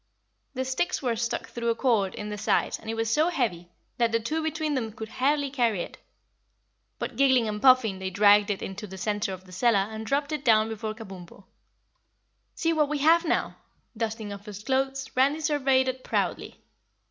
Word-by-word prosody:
The 260 +1 -2
sticks 270 +6 -1
were 240 -3 +1
stuck 230 +1 -3
through 235 -1 -2
a 230 - +2
cord 225 -7 +1
in 210 0 -6
the 210 - -4
side - - +1
and - - -9
it 225 - -2
was 225 0 -1
so 310 +8 +3
heavy 215 - -2 0.3
that 235 -1 +3
the 230 - +2
two 305 +8 -2
between 315 -1 -2
them 235 -5 -2
could 220 0 -8
hardly 280 +2 0
carry 235 -8 +1
it. - - -11 1.0
But 235 - -5
giggling 260 -4 +4
and 210 0 -3
puffing 255 -7 +5
they 190 0 -3
dragged 205 +2 +5
it 200 - -2
into 200 +2 -6
the 190 0 -9
center 205 0 -1
of 185 0 -8
the 185 - -15
cellar 200 +1 +2
and 220 0 -6
dropped 280 +5 -1
it 305 -2 -3
down 220 -3 +4
before 220 0 -4
Kabumpo. 195 -4 -11 1.1
"See 330 0 +1
what 300 -2 +2
we 300 - -1
have 330 +4 +4
now!" - - -1 0.4
Dusting 220 -2 -3
off 200 +1 -11
his 205 0 -8
clothes, 270 +1 -1
Randy 275 +4 +3
surveyed 270 -4 +2
it 260 0 -3
proudly. - - -2
230 Hz, 195 wpm, -27 LUFS, 210-270 Hz, 1.1 s, puffing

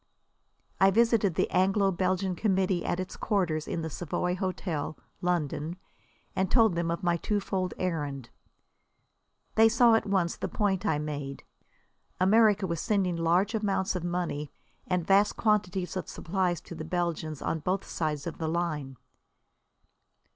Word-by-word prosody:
I 195 - +6
visited 220 -3 +3
the - - +2
Anglo 195 +2 +3
Belgian 185 +1 0
Committee 190 -2 +1
at 175 - -1
its 185 0 -5
quarters 175 -8 0
in 165 - -3
the 160 - -3
Savoy 180 +2 -2
Hotel, 180 -5 -3 0.2
London, 165 -1 -1 0.6
and 190 -1 +1
told 225 -6 +4
them 170 0 -1
of 170 +3 -2
my 175 -1 +2
twofold 195 -1 -2
errand. 145 -8 -3 1.2
They 225 0 +6
saw 235 0 +5
at 225 - +2
once 190 -4 +1
the - - -3
point 205 -1 0
I 160 - +2
made. 145 -2 -5 0.8
America 205 +1 +4
was 170 -3 -2
sending 190 -4 +1
large 175 +5 +2
amounts 200 -3 0
of 180 - -3
money 170 -5 -2 0.4
and 180 -2 0
vast 200 +2 +3
quantities 195 -5 0
of 185 - -4
supplies 180 -2 -1
to - - -10
the 160 - -6
Belgians 160 -3 -2
on 165 - -2
both 185 +5 -1
sides 150 -3 -2
of 170 - -6
the 160 -1 -1
line. 155 -6 -2
180 Hz, 145 wpm, -28 LUFS, 165-195 Hz, 1.2 s, I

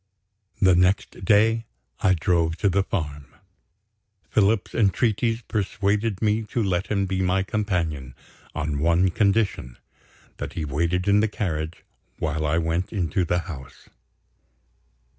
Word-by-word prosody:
The 95 -2 +5
next 90 +1 +1
day 110 +3 +3 0.3
I 95 - +3
drove 85 -1 +1
to 100 - +2
the 100 +2 +2
farm. 75 -7 -4 1.0
Philip's 105 -1 +2
entreaties 115 +2 +1
persuaded 105 0 -1
me 110 +1 +2
to 115 +2 -1
let 95 -2 0
him 100 -2 0
be 95 0 -1
my 95 +1 +1
companion, 85 - -2 0.4
on 75 -2 -2
one 85 +4 +3
condition 100 - 0 0.6
that - - -5
he 80 - -3
waited 85 +6 -1
in 100 +1 +5
the 110 - +3
carriage 80 -6 -4 0.3
while 80 0 -1
I 80 +3 +1
went 85 +2 -1
into 95 -2 0
the 85 +1 0
house. 75 -7 -10
95 Hz, 130 wpm, -24 LUFS, 80-105 Hz, 1.0 s, The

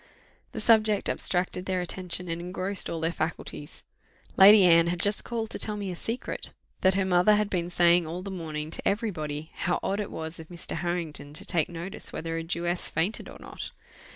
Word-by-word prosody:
The - - -4
subject 215 -3 +4
abstracted 180 0 -1
their 185 -1 0
attention, 180 0 -3
and 165 0 -3
engrossed 185 +2 0
all 165 - -3
their 165 +1 0
faculties. 155 -1 -5 0.5
Lady 200 +1 +9
Anne 170 -1 +6
had 175 0 -1
just 205 +3 +1
called 230 -2 -3
to - - -3
tell 210 -1 -1
me 200 -2 -3
a - - -5
secret, 230 +7 -4 0.3
that 190 0 +4
her 195 -1 +2
mother 180 +3 +5
had 210 0 0
been 175 -2 -1
saying 175 -1 +4
all 175 +3 -5
the 195 - -5
morning 155 -4 -5
to - - -1
every 215 +2 +1
body, 155 -1 -5
how 175 - -1
odd 200 +2 0
it 205 - -3
was 160 +1 -5
of 160 - -9
Mr. 175 0 -4
Harrington 160 -5 -3
to - - -6
take 165 -3 +1
notice 175 +2 -6
whether 165 0 -4
a 165 - -1
Jewess 175 +1 -1
fainted 170 +7 -1
or - - -10
not. - - -8
175 Hz, 205 wpm, -27 LUFS, 165-195 Hz, 0.5 s, Lady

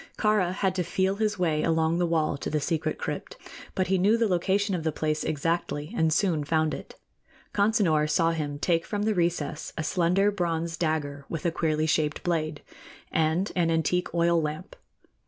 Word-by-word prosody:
Kāra 210 -5 +2
had 190 0 0
to 185 -1 -1
feel 190 +3 0
his 210 -1 0
way 160 -4 +1
along 165 +1 +1
the 175 - +2
wall 160 -3 +1
to 140 - -4
the 150 - 0
secret 160 +2 -1
crypt, - - -5 0.4
but 185 - +1
he 190 0 +1
knew 205 +5 +4
the 230 -1 +2
location 195 +2 +1
of 170 -3 -2
the 160 - 0
place 155 0 -1
exactly, 155 +2 -2
and 160 -6 +2
soon 165 -2 +1
found 155 +1 +1
it. - - -8 0.6
Consinor 200 -8 +2
saw 165 0 +3
him 150 -3 -3
take 165 +2 +1
from 205 +2 -3
the 215 0 +2
recess 170 -4 -1
a 160 - -1
slender 180 +5 +2
bronze 170 -3 -2
dagger 150 -4 -2
with 165 0 -5
a 170 - +2
queerly 155 -2 0
shaped 150 -1 0
blade, 155 -3 -1 0.5
and 160 +5 +1
an 170 -2 +2
antique 165 +2 0
oil 170 0 +3
lamp. 155 +5 -5
165 Hz, 185 wpm, -27 LUFS, 155-185 Hz, 0.6 s, knew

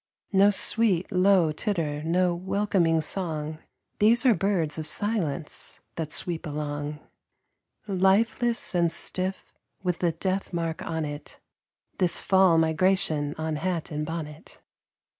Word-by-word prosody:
No 195 +1 +6
sweet, 205 -3 +1
low 185 -3 +4
titter, 155 -4 -2
no 175 +3 +1
welcoming 180 -2 +1
song; 155 -3 -3 0.4
These 230 +5 +4
are 250 - +6
birds 170 -5 0
of 155 - -4
silence 175 -6 -2
that 160 -3 -5
sweep 170 +1 0
along. 145 0 -4 0.9
Lifeless 215 +5 +2
and 170 -2 +2
stiff, 185 +2 -3 0.3
with 180 -2 -1
the 170 -2 +1
death 190 +3 -3
mark 165 -1 -2
on 160 -1 -3
it, 145 0 -8 0.6
This 180 -3 +4
"Fall 190 -3 +4
Migration" 160 -2 +1
on 160 -1 -2
hat 170 0 -3
and 150 0 -2
bonnet. 155 -1 -7
170 Hz, 120 wpm, -26 LUFS, 155-190 Hz, 0.9 s, No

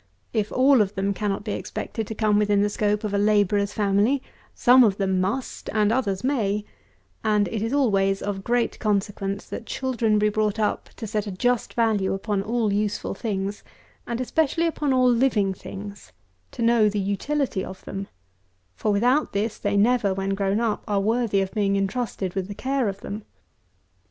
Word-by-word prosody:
If 215 -2 0
all 260 -1 +5
of 205 0 -1
them 195 +1 0
cannot 205 0 -2
be 210 - -4
expected 220 +1 -4
to 220 - -5
come 210 -1 +2
within 205 -1 +3
the 205 - 0
scope 210 0 0
of 210 -1 -2
a 200 - +2
labourer's 205 -1 +2
family, 210 +7 +1 0.3
some 250 +1 +6
of 205 -4 +2
them 190 -2 +1
must, 240 +8 -3
and 215 -1 +3
others 205 -6 0
may: 210 -6 0 0.6
and 210 -2 +2
it 220 +2 -3
is 225 +2 -1
always 195 -8 +2
of 195 -1 -3
great 240 +1 0
consequence, 200 -1 -1
that 230 - -6
children 235 -5 0
be 210 0 +3
brought 210 0 0
up 215 -1 -1
to 225 - -6
set 210 -1 -2
a - - -3
just 245 +5 0
value 215 -5 +1
upon 200 0 -1
all 220 0 0
useful 210 0 -1
things, 200 -1 -3 0.4
and 235 0 -3
especially 315 +6 +1
upon 300 -3 0
all 255 -1 +4
living 230 -5 +2
things; 200 +2 -9 0.4
to 235 - -3
know 230 -2 +4
the 205 0 -2
utility 200 +3 -1
of 190 - -9
them: 195 0 -5 0.7
for, 210 - -1
without 250 +9 +2
this, 210 +2 -1
they 205 0 0
never, 210 -2 +3
when 195 0 -2
grown 195 +1 0
up, 230 -3 -1
are 205 -1 +1
worthy 220 -1 +1
of 190 0 -2
being 200 -2 +1
entrusted 195 -2 -2
with 190 -1 -2
the 205 - -7
care 265 -2 0
of 195 0 -7
them. 205 +2 -6
210 Hz, 185 wpm, -24 LUFS, 200-235 Hz, 0.7 s, some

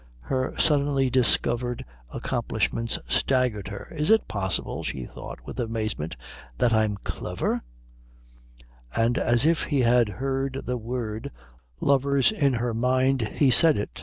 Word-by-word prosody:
Her 130 - -2
suddenly 140 -3 +2
discovered 120 -1 +1 0.3
accomplishments 115 0 -1
staggered 125 -7 +1
her. 100 0 -7
"Is 150 0 0
it 220 0 +4
possible," 95 -3 -2
she 65 - -4
thought - - -10
with 125 - -7
amazement, 110 -8 -3 0.4
"that 120 - +2
I'm 110 -2 +2
clever?" - - -2 1.3
And 115 +2 +2
as 120 +2 +3
if 165 0 +2
he 145 -4 +1
had 120 -2 +4
heard 135 +4 -2
the 125 0 -2
word 115 -2 -4 0.5
lovers 140 +1 +3
in 145 -11 +1
her 120 0 -1
mind 130 +3 +2
he 140 -3 +4
said 160 +5 +6
it. 105 - -5
125 Hz, 135 wpm, -25 LUFS, 115-135 Hz, 1.3 s, said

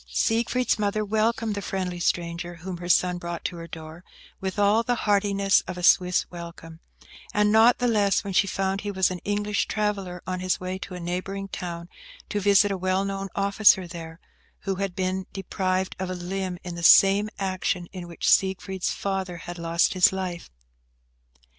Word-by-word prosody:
Siegfried's 230 - +1
mother 210 +1 0
welcomed 220 +1 0
the 200 - -4
friendly 185 -3 -3
stranger 170 0 -2
whom 175 +2 -7
her 175 +1 -7
son 180 0 +3
brought 170 -1 -6
to - - -2
her 165 0 -8
door 160 +1 -10 0.4
with 190 +1 -4
all 205 +2 +4
the 245 +1 0
heartiness 200 -1 +3
of 180 - -5
a 180 - -6
Swiss 180 +1 +4
welcome; 170 -2 -9 0.6
and 210 0 +3
not 225 +3 +6
the 245 - 0
less 205 -4 +2
when 200 -2 -5
she 195 - +3
found 195 +1 -1
he 205 - -4
was 190 -2 +1
an 180 - -4
English 205 +2 -1
traveller, 200 -4 -2
on 185 0 -3
his 185 0 0
way 185 +1 -4
to 190 -1 -7
a - - -6
neighbouring 185 +3 -4
town 170 -3 -6 0.4
to 210 - -1
visit 200 0 +4
a 195 - -1
well 185 +1 0
known 195 0 -3
officer 200 -1 +4
there, 165 -1 -9 0.4
who 195 - -2
had 195 -2 -3
been 185 0 -2
deprived 190 -1 -2
of 190 -1 -3
a 185 - -3
limb 180 +1 -4
in 180 - -6
the 170 - -6
same 195 +4 +6
action 185 -2 -1
in 180 -2 -7
which 170 - -4
Siegfried's 190 -1 +2
father 190 -3 -3
had 175 +1 -8
lost 170 0 +1
his 185 -2 +5
life. 185 -3 -5
190 Hz, 185 wpm, -25 LUFS, 175-200 Hz, 0.6 s, not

